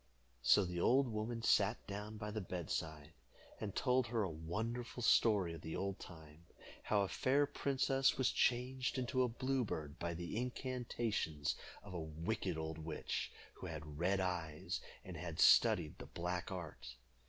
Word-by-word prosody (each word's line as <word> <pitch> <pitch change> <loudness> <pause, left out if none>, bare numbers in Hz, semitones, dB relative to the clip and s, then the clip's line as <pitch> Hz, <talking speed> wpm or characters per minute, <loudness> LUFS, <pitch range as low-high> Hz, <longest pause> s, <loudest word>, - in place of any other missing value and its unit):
So 95 +10 +6
the 90 -1 -3
old 135 +6 +5
woman 115 +1 -3
sat 105 0 +3
down 105 +2 -5
by 105 0 -4
the 110 0 -2
bedside, 80 -4 -4 0.5
and 100 -3 -4
told 125 -1 +3
her 115 -1 +1
a 95 - -1
wonderful 115 +10 -3
story 100 -8 +4
of 80 - -8
the 80 0 -5
olden 100 -1 -2
time, 80 -1 -12 0.4
how 105 -1 +2
a 100 - +1
fair 140 +8 +3
princess 135 -1 +2
was 130 - +3
changed 130 +2 +1
into 130 +1 +1
a 125 - +4
blue 130 +2 0
bird 75 -7 -4
by 85 0 -2
the 85 +5 -4
incantations 120 - -1 0.3
of 100 -2 -9
a 85 - -3
wicked 85 +4 -2
old 80 0 -4
witch, 80 -1 -3 0.2
who 95 - -7
had 75 -2 -7
red 95 +3 +2
eyes, 85 -5 -2 0.2
and - - -6
had - - -5
studied - - +6
the - - -8
black 90 +1 -3
art. 75 -9 -6
100 Hz, 165 wpm, -38 LUFS, 80-120 Hz, 0.5 s, So